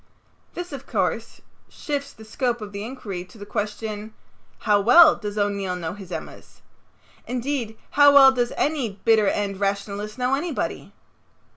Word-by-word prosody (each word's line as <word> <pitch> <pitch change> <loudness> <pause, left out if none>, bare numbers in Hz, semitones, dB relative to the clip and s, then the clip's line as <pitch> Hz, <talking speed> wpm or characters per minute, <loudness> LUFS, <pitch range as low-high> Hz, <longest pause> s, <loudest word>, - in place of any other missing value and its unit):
This, 355 -3 -6
of 275 -1 -8
course, - - -2 0.3
shifts 285 -2 -4
the 220 - -14
scope 240 +2 -1
of 210 -2 -8
the 200 0 -6
inquiry 215 -7 -6
to 185 +4 -17
the 205 - -9
question, 210 0 -4 0.4
"How 205 -2 +2
well 305 +9 +8
does 210 -1 -6
O'Neill 200 -3 -1
know 165 -3 -4
his 195 -3 -11
Emmas?" - - -9 0.6
Indeed, 245 -3 -3
how 285 0 +7
well 270 -1 +9
does 245 -2 -1
any 260 -10 -1
bitter 220 -3 +4
end 200 -1 -1
rationalist 200 +2 -3
know 250 +1 0
anybody? 295 +2 -3
220 Hz, 150 wpm, -23 LUFS, 205-265 Hz, 0.6 s, well